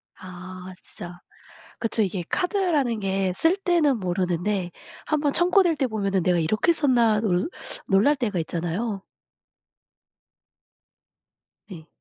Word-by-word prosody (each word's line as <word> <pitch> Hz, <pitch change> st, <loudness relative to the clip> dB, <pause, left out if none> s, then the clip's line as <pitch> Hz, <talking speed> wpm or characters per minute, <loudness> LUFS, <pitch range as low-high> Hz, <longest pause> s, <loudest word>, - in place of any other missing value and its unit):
아 185 Hz, 0 st, -10 dB
진짜. 175 Hz, 0 st, -10 dB, 0.6 s
그쵸. 225 Hz, -1 st, 0 dB
이게 185 Hz, -2 st, -2 dB
카드라는 335 Hz, -, 0 dB
게 190 Hz, -1 st, 0 dB
쓸 330 Hz, -, +2 dB
때는 335 Hz, -, +2 dB
모르는데 180 Hz, 0 st, -1 dB, 0.4 s
한번 295 Hz, -2 st, +1 dB
청구될 350 Hz, -1 st, +3 dB
때 270 Hz, -, +1 dB
보면은 200 Hz, -5 st, -1 dB
'내가 180 Hz, 0 st, +2 dB
이렇게 215 Hz, -, +2 dB
썼나?' 240 Hz, -8 st, +3 dB
놀 185 Hz, -, 0 dB, 0.4 s
놀랄 210 Hz, +10 st, +4 dB
때가 210 Hz, -8 st, -1 dB
있잖아요. 175 Hz, +6 st, -3 dB, 2.7 s
네. 165 Hz, -4 st, -10 dB
210 Hz, 225 characters per minute, -24 LUFS, 180-285 Hz, 2.7 s, 놀랄